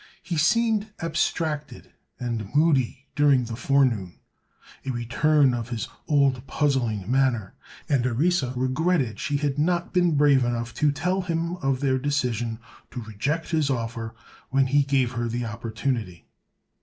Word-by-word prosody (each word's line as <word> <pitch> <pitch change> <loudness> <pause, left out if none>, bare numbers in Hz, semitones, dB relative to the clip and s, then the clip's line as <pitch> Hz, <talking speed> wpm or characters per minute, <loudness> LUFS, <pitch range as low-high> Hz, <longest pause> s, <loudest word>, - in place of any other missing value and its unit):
He 175 - -3
seemed 220 +6 +2
abstracted 155 -2 -2 0.3
and 115 -5 -3
moody 140 -4 +2
during 145 -3 +4
the 115 -1 -5
forenoon—a 125 -1 -2
return 130 +3 +2
of 120 -1 -4
his 115 -3 -3 0.2
old 135 -3 +2
puzzling 120 -8 0
manner—and 130 +1 -1
Orissa 135 +2 +1
regretted 130 - 0
she 145 +1 -1
had 145 -1 -1
not 175 +2 0
been 175 -3 +3
brave 140 -3 +5
enough 120 -1 -2
to 150 -1 +2
tell 180 +6 -1
him 170 -1 -2
of 135 -5 -1
their 130 -2 +1
decision 125 -5 -1 0.3
to 125 - -6
reject 135 +10 -3
his 155 -3 +1
offer 115 -2 -3 0.3
when 135 0 +3
he 140 +2 +3
gave 135 -3 +1
her 120 -1 -2
the 120 +1 -2
opportunity. 115 -4 -3
135 Hz, 135 wpm, -25 LUFS, 120-150 Hz, 0.3 s, brave